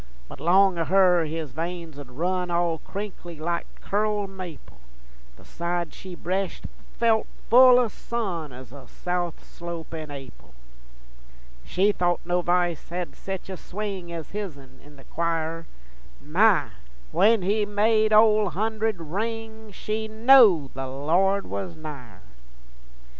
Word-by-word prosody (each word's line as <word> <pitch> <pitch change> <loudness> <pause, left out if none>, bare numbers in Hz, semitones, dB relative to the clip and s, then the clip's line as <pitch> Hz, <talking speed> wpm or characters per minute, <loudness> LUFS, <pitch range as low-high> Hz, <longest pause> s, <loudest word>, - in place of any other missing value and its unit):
But - - -11
long 185 +2 +4
o' 165 - +1
her 180 -2 +4
his 155 -2 -4
veins 165 0 -5
'ould 140 -3 -10
run 180 +7 -1
All 170 -1 0
crinkly 190 -5 -7
like 170 +2 -2
curled 205 -1 -1
maple, 165 - -10 0.6
The - - -18
side 170 0 -3
she 185 -2 -9
breshed 185 +2 -3 0.3
felt 225 -2 +2 0.2
full 250 +1 +9
o' 250 -1 +3
sun 195 - -4
Ez 125 -1 -11
a 135 -3 -12
south 175 +1 -3
slope 170 -2 -8
in 155 -2 -6
Ap'il. 135 - -11 1.1
She 195 - +2
thought 175 -3 0
no 175 +1 +1
v'ice 175 -2 0
hed 175 0 -4
sech 190 -1 -6
a 190 - -5
swing 190 -2 -6
Ez 165 -2 -7
hisn 140 -11 -7
in 145 0 -16
the 135 - -15
choir; 165 0 -2 0.5
My! - - +3 0.4
when 215 - +4
he 210 +3 +1
made 215 +1 +2
Ole 215 -1 +5
Hunderd 220 +2 -1
ring, 220 +5 -5
She 215 +3 -3
knowed 220 - +6
the 135 0 -4
Lord 175 +9 +1
was 180 -4 -5
nigher. 145 - -9
180 Hz, 135 wpm, -25 LUFS, 160-210 Hz, 1.1 s, full